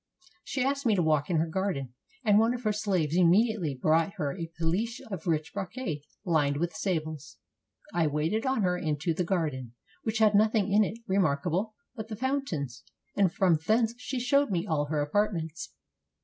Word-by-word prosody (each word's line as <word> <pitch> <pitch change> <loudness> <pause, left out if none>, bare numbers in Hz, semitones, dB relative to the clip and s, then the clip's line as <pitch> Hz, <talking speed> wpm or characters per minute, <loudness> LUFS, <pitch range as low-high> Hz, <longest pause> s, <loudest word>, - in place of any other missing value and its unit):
She 265 +1 -2
asked 275 +1 0
me 215 - +4
to 180 - +2
walk 155 -1 +1
in 175 - +1
her 160 - +2
garden, 160 -7 -2 0.3
and 210 -1 +5
one 230 +2 +3
of 250 - -7
her 215 -1 +1
slaves 185 -7 0
immediately 180 - +3
brought 165 +7 +2
her 145 -2 -2
a 165 -3 -5
pellice 190 +9 -1
of 180 -3 -5
rich 155 -2 0
brocade 195 - -4 0.2
lined 150 -5 +2
with 170 +2 -1
sables. 155 -4 -3 0.6
I 165 -2 +2
waited 155 +9 0
on 260 -5 +1
her 180 -1 +2
into 155 +1 -1
the 180 - -1
garden, 150 -9 -2 0.3
which 220 -1 -2
had 215 -1 +4
nothing 215 -1 +3
in 210 +2 +5
it 210 +2 -3
remarkable 185 +3 0 0.2
but 220 -3 -6
the 220 - -5
fountains; 200 - -2 0.3
and 195 -4 +3
from 175 -4 +3
thence 225 +1 +3
she 255 0 -3
showed 280 +3 +2
me 180 -2 -1
all 155 -6 0
her 150 0 -1
apartments. 170 -1 -1
180 Hz, 180 wpm, -28 LUFS, 155-215 Hz, 0.6 s, and